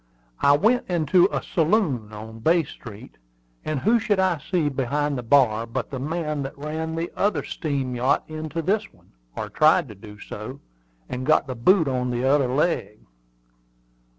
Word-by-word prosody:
I 140 0 +5
went 225 +8 +2
into 175 +2 +3
a - - -2
saloon 160 - 0
on 110 +1 -9
Bay 165 +8 +3
Street, 105 - -12 0.4
and 155 -4 -2
who 230 +3 +3
should 205 -3 0
I 185 -4 +2
see 165 +1 -1
behind 145 +2 -1
the 125 - -3
bar 115 -3 +3
but 120 +1 -4
the 135 - -4
man 150 +1 -2
that 135 0 -6
ran 160 +2 -4
the 165 +1 -3
other 205 +1 0
steam 140 -5 -3
yacht 125 +3 +1
into 155 +1 -5
this 200 +6 0
one, - - -26 0.2
or 105 - -4
tried 155 +7 +3
to - - -8
do 105 +1 -13
so, 110 +7 -8 0.5
and 125 - -5
got 155 +1 +3
the 130 - -5
boot 160 - +3
on 125 -1 -1
t'other 130 +3 +2
leg." 125 - -1
145 Hz, 170 wpm, -24 LUFS, 125-165 Hz, 0.5 s, I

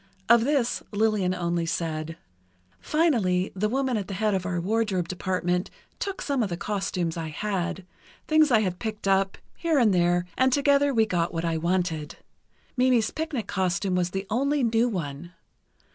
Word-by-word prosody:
Of 235 -1 +5
this, 255 -5 +1
Lillian 210 -3 +1
only 170 -1 -1
said: 160 -1 -3 0.6
"Finally, 220 - +1
the 210 +3 0
woman 260 -1 0
at 200 -3 -4
the 195 - -5
head 215 +1 +1
of 190 -1 -1
our 175 -1 -1
wardrobe 195 -2 0
department 180 0 -1 0.3
took 395 -1 -4
some 280 -3 0
of 210 - 0
the 170 - -3
costumes 185 -4 -2
I 165 -1 -3
had—things 195 - -1
I 230 -4 +4
had 185 -4 -2
picked 215 -3 -4
up, 195 0 +2 0.2
here 330 -3 0
and 230 -6 +4
there—and 175 +8 +2
together 285 +1 +3
we 225 -4 +3
got 175 -4 -1
what 165 +1 -1
I 165 -1 0
wanted. 170 -2 -1 0.6
Mimi's 250 -3 +3
picnic 310 -9 -3
costume 185 -1 -1
was 180 -1 +1
the 195 +2 -4
only 280 +4 +1
new 230 +1 +2
one. 170 -3 -5
195 Hz, 160 wpm, -26 LUFS, 175-235 Hz, 0.6 s, Of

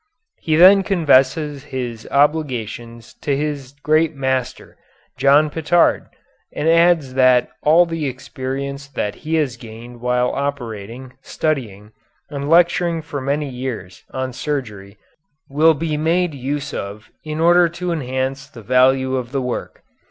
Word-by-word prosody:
He 155 - 0
then 190 +4 +7
confesses 150 -5 +2
his 125 -5 -6
obligations 120 -6 -1
to 140 -2 0
his 140 -2 -4
great 155 +1 +2
master, 130 -2 -3 0.4
John 140 +3 +4
Pitard, 165 +2 +2 0.4
and 155 - -3
adds 165 -5 +3
that 130 -1 +4
all 165 +4 +5
the 165 -3 -3
experience 135 +2 -5
that 105 -7 -3
he 160 +1 -4
has 140 -6 0
gained 120 +1 -11
while 125 0 +1
operating, 125 -3 -5
studying, 110 -10 -3 0.4
and 140 0 -4
lecturing 170 0 +3
for 145 -3 -6
many 145 +2 -1
years 125 -8 -6
on 130 -1 -4
surgery 110 -9 -5 0.5
will 155 +3 +3
be 155 0 -2
made 165 +2 +1
use 140 +1 -4
of 100 +2 -7
in 155 0 -5
order 175 +1 +5
to 175 +1 -4
enhance 135 -2 -3
the 120 -6 -13
value 130 +3 +3
of 125 -2 -4
the 135 -1 -1
work. 125 -1 -5
140 Hz, 135 wpm, -19 LUFS, 125-155 Hz, 0.5 s, then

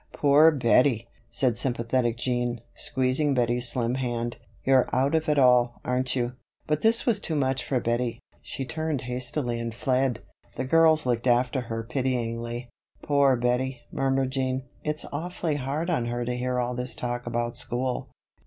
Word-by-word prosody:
"Poor 145 +2 +6
Bettie!" 125 -4 +3 0.2
said 120 -3 0
sympathetic 120 -1 0
Jean, 120 -1 -1
squeezing 130 +2 0
Bettie's 120 0 +2
slim 120 -1 -1
hand. 120 -2 -2 0.3
"You're 130 -1 +4
out 135 +3 +1
of 160 0 +1
it 150 - +2
all, 125 -2 +4
aren't 125 +1 0
you?" 120 -1 -1 0.3
But 150 0 0
this 225 +1 +4
was 225 -5 +2
too 165 - -3
much 135 -2 0
for 130 - 0
Bettie. 120 0 -1 0.2
She 135 - -5
turned 155 0 -2
hastily 125 0 -2
and 115 -1 -4
fled. 130 -2 0 0.3
The 130 - -3
girls 160 +1 +4
looked 120 0 0
after 125 +2 +2
her 115 -1 -4
pityingly. 120 -1 -2 0.4
"Poor 140 -2 +4
Bettie!" 125 +1 -1
murmured 135 -1 0
Jean. 130 -1 -1 0.2
"It's 150 0 -2
awfully 165 0 -2
hard 145 +6 -2
on 125 -8 0
her 120 0 -2
to 125 +1 -2
hear 125 0 -1
all 125 0 -1
this 125 0 -3
talk 120 0 -4
about 120 0 -2
school. 125 +1 -2
125 Hz, 165 wpm, -26 LUFS, 120-135 Hz, 0.4 s, Poor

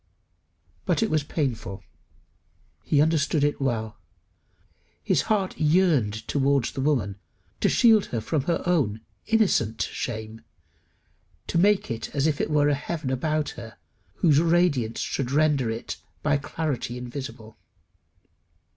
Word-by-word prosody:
But 180 +5 +2
it 220 - -1
was 155 -1 +2
painful. 110 - -3 1.0
He 145 -1 +3
understood 155 -1 +1
it 145 -1 0
well. 110 -5 -2 1.0
His - - +2
heart 200 -4 0
yearned 150 - +2
towards 140 -3 +1
the 135 - -4
woman 120 -9 0 0.4
to - - +2
shield 225 -4 +5
her 115 - -2
from 140 +5 -2
her 170 - 0
own 140 -12 +1 0.3
innocent 185 - +2
shame, 110 -1 -4 1.0
to 170 - 0
make 205 -3 +3
as 115 +5 -2
it 150 -1 0
were 150 -1 +3
a 145 - +3
heaven 145 -1 -3
about 150 +3 0
her 115 -2 -10 0.4
whose 150 +2 +4
radiance 165 -9 +2
should 130 -3 -2
render 145 -3 +2
it 115 +1 -5 0.3
"by 145 -1 +2
clarity 140 -4 -3
invisible." 125 -3 -8
140 Hz, 125 wpm, -25 LUFS, 115-160 Hz, 1.0 s, shield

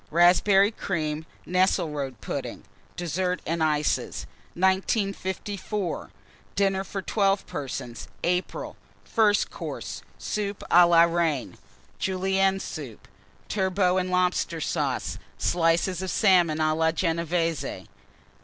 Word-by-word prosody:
Raspberry 195 +4 +5
Cream. 160 -6 -3 0.2
Nesselrode 155 - 0
Pudding. - - -5 0.3
DESSERT 180 +2 -1
AND 165 +1 -1
ICES. 150 -1 0 0.3
1954. 195 +1 -1 0.5
DINNER 195 -1 +2
FOR 195 0 -5
12 195 -1 +1
PERSONS 125 -5 -6 0.2
(April). 180 +1 -2 0.3
FIRST 210 -3 +2
COURSE. - - -6 0.2
Soup 205 -1 -3
à 175 0 +7
la 170 -1 +7
Reine. 165 -5 0 0.4
Julienne 190 +1 +1
Soup. 140 - -7 0.4
Turbot 190 -2 +1
and 185 0 -2
Lobster 180 -2 +1
Sauce. - - -2 0.2
Slices 170 +1 +1
of 190 - -3
Salmon 175 -7 +4
a 155 0 +2
la 160 +1 +2
Genévése. 165 -1 -1
180 Hz, 100 wpm, -26 LUFS, 165-195 Hz, 0.5 s, à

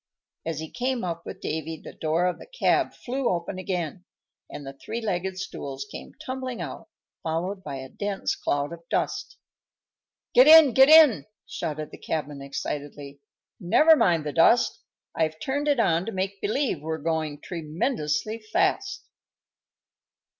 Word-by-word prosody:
As 165 -2 -2
he 160 0 -7
came 255 -1 -2
up 170 -2 -4
with - - -8
Davy 160 +1 -4
the - - -11
door 160 +3 0
of 180 -1 -1
the - - -12
cab - - +1
flew 260 +1 -2
open 175 +1 -2
again, 180 -2 -3 0.5
and 145 -1 -8
the 135 - -7
three 225 +11 -6
legged 190 -4 -2
stools 140 -8 -6
came - - -10
tumbling 260 -3 -4
out, 155 -7 -7 0.3
followed 180 +5 -3
by 145 -4 -5
a 130 0 -7
dense 200 +3 -2
cloud 145 +2 -1
of 170 - -10
dust. - - -2 1.0
"Get 255 +3 +7
in! 310 -5 +9
Get 265 +3 +7
in!" 310 -10 +7 0.2
shouted 155 -2 -5
the - - -11
cabman, 150 -3 -4
excitedly. 140 0 -6 0.4
"Never 305 - +6
mind 170 - +2
the 150 - -3
dust; 230 +9 +4 0.3
I've 160 -1 -1
turned 285 - -2
it 285 -4 +3
on 175 -3 +2
to - - -2
make 190 0 -3
believe 220 - 0
we're 160 +1 -3
going 155 -1 -2
tremendously 170 - -2
fast." 395 - 0
175 Hz, 155 wpm, -26 LUFS, 155-230 Hz, 1.0 s, in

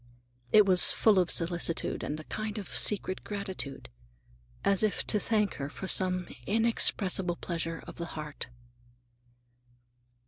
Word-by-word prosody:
It 210 -1 +6
was 185 -2 +5
full 210 -4 +3
of 180 - +1
solicitude, 170 -1 +1
and 150 +1 -4
a - - -8
kind 215 +5 -5
of 205 - -7
secret 190 -2 0
gratitude, 190 -9 -4 0.8
as 195 -2 +3
if 215 -2 0
to 210 - +3
thank 210 -2 0
her 140 0 -5
for 190 - -8
some 185 -1 +4 0.2
inexpressible 200 -5 +1
pleasure 165 -1 -5
of - - -11
the 170 - -5
heart. 150 -1 -6
185 Hz, 135 wpm, -29 LUFS, 170-210 Hz, 0.8 s, It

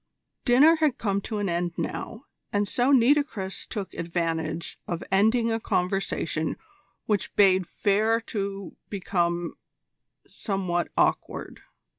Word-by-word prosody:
Dinner 285 +7 +6
had 305 -5 +2
come 200 -2 0
to 215 - -4
an 205 -1 -1
end 175 0 -1
now, 230 +5 -4 0.3
and 205 0 +1
so 245 +6 +2
Nitocris 255 -7 +2
took 205 -5 -5
advantage 165 -1 -3
of 170 -1 -3
ending 220 +4 +3
a 225 - 0
conversation 180 -5 -1 0.5
which 210 -2 -1
bade 190 -3 +5
fair 215 +2 +2
to 200 -4 -5
become 175 -3 -1 0.7
somewhat 185 -4 -2
awkward. - - 0
200 Hz, 115 wpm, -26 LUFS, 175-225 Hz, 0.7 s, Dinner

